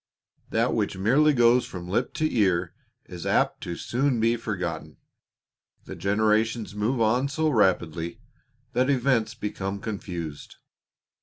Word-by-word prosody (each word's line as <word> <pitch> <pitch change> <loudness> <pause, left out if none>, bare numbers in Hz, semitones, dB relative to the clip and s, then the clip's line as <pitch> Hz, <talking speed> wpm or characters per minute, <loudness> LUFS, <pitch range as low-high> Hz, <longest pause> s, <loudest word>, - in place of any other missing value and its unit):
That - - +1
which - - -1
merely 135 +11 +4
goes 120 -2 +4
from 90 -1 -8
lip 105 +7 -1
to 155 0 0
ear 95 -5 +2 0.3
is 90 -3 -7
apt - - +1
to 85 - -4
be - - -7
soon 120 -3 +1
forgotten. 85 -8 -4 0.9
The - - -7
generations 110 +2 +1
move 110 +5 -1
on 120 +4 +2
so 155 +3 0
rapidly 90 - +1 0.5
that 130 +2 +2
events 120 -4 +1
become 100 -2 -4
confused. 90 -8 -6
110 Hz, 130 wpm, -26 LUFS, 95-120 Hz, 0.9 s, merely